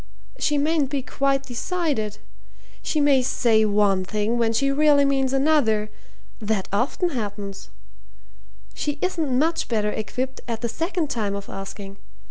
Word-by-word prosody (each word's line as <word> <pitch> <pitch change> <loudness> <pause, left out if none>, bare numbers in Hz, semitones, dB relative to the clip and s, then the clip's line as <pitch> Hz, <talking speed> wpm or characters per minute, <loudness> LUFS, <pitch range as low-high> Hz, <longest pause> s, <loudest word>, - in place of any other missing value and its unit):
She 295 - +1
mayn't 295 -1 +1
be 280 -2 -2
quite 275 +1 0
decided. 275 - -2 0.6
She 305 - -1
may 285 -2 +4
say 225 -3 +3
one 205 -2 +2
thing 215 +4 -1
when 230 -1 +2
she 275 +5 +1
really 290 0 +4
means 270 -1 +1
another. 265 -7 +2 0.5
That 210 -3 -1
often 255 - +1
happens. 205 - -5 1.0
She 295 0 -2
isn't 320 -8 0
much 325 +4 +1
better 210 -3 0
equipped 255 +5 -4
at 230 -2 -3
the 235 - -1
second 330 - -2
time 205 -4 -1
of 200 0 -7
asking. 195 0 -7
250 Hz, 140 wpm, -23 LUFS, 210-290 Hz, 1.0 s, may